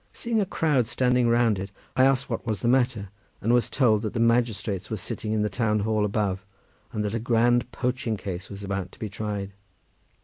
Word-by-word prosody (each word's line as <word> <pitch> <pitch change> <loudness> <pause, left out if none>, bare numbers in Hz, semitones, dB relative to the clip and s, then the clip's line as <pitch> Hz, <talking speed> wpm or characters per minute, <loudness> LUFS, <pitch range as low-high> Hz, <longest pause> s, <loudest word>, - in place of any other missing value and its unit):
Seeing 230 -2 0
a 195 - -1
crowd 150 - +1
standing 125 0 +2
round 115 -3 +3
it, 95 +2 -5 0.3
I 130 +1 +5
asked 135 0 +2
what - - -3
was 110 -6 -2
the - - 0
matter, 120 -5 +2 0.3
and 115 +4 +1
was 120 -1 +3
told 115 -6 +3
that 110 -2 -3
the - - -2
magistrates 115 -4 +1
were 110 - -2
sitting 105 +3 -4
in 110 -1 +1
the - - +1
town 105 0 0
hall 110 0 +1
above, 100 -2 -1 0.5
and 105 -1 -2
that 105 - -2
a 115 - 0
grand 120 +1 +2
poaching 125 -3 -1
case 90 -1 -6
was 100 0 -8
about 100 -2 -3
to - - -16
be 110 - -4
tried. 100 -1 -4
110 Hz, 210 wpm, -26 LUFS, 100-120 Hz, 0.5 s, I